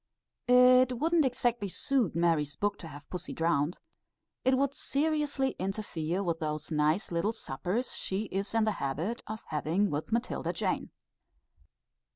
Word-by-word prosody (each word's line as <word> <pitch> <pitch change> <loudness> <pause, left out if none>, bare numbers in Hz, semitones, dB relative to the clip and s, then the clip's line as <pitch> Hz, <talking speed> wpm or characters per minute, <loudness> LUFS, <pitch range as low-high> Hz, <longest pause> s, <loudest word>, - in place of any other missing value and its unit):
It 250 +1 +6
wouldn't 320 +3 +3
exactly 240 -5 0
suit 245 - 0
Mary's 165 -4 +1
book 205 0 -1
to 165 - -8
have 145 -1 -11
pussy 180 -1 -4
drowned. 165 -1 +1 0.7
It 260 0 +3
would 275 0 +1
seriously 290 -2 0
interfere 190 -2 -2
with 170 -3 -1
those 155 0 -3
nice 155 +6 +1
little 175 +6 0
suppers, 190 - -3
she 195 +2 -2
is 195 +3 -2
in 225 - +4
the 215 - +2
habit 160 - -2
of 220 +1 -6
having 165 +6 +1
with 150 +8 -3
Matilda 235 +2 -1
Jane. - - -1
200 Hz, 145 wpm, -30 LUFS, 165-250 Hz, 0.7 s, It